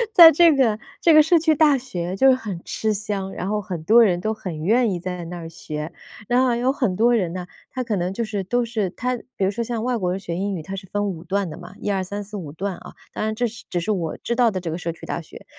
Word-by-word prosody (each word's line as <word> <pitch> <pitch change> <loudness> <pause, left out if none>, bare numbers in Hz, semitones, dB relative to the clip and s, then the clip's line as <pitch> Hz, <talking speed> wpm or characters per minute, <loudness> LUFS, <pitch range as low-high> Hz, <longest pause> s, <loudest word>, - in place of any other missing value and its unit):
在 330 -2 +11
这 335 +2 +6
个 230 -6 +2 0.2
这 335 - +5
个 310 - +9
社 320 +3 +4
区 320 -1 +3
大 300 -2 +4
学 185 -9 -4
就 265 +7 +4
是 265 - +8
很 210 -8 -5
吃 220 - -1
香， 200 -2 -3
然 180 - -4
后 210 +1 0
很 180 -5 -6
多 230 +8 +6
人 180 -5 +2
都 215 +4 -1
很 170 -7 -6
愿 230 +6 +3
意 180 - -2
在 180 0 -5
那 175 +1 -6
儿 165 -1 -7
学。 155 -1 -6 0.3
然 245 +1 +3
后 245 -2 +2
有 250 +2 +1
很 250 -9 0
多 235 +5 +4
人 180 -7 0
呢， 180 -1 -5 0.2
他 255 - -3
可 230 -3 -1
能 180 +1 -1
就 230 +5 -2
是 205 -2 -3
都 245 +6 0
是 220 -5 -1
他 250 +7 -2 0.2
比 195 - +1
如 190 - +1
说 235 +3 -2
像 230 -1 -3
外 250 0 0
国 185 -6 -1
人 185 +2 -2
学 170 -3 -5
英 195 +2 -2
语， 165 - -6
他 190 +4 -6
是 190 0 -8
分 205 +2 -1
5 170 -4 -5
段 195 +2 -1
的 155 - -7
嘛， 180 +2 -11
一 205 - -2
二 190 -1 0
三 200 +2 -5
四 210 +2 -9
五 170 -8 -6
段 190 +4 -4
啊。 - - -12 0.2
当 - - -3
然 220 0 -1
这 245 - 0
只 215 -5 -5
是 170 +5 -1
我 170 -6 -2
知 235 - -3
道 240 -1 +4
的 190 -3 -3
这 170 -2 -4
个 165 - -3
社 170 -1 -3
区 165 - -11
大 - - -3
学。 160 - -13
200 Hz, 310 characters per minute, -22 LUFS, 180-235 Hz, 0.3 s, 在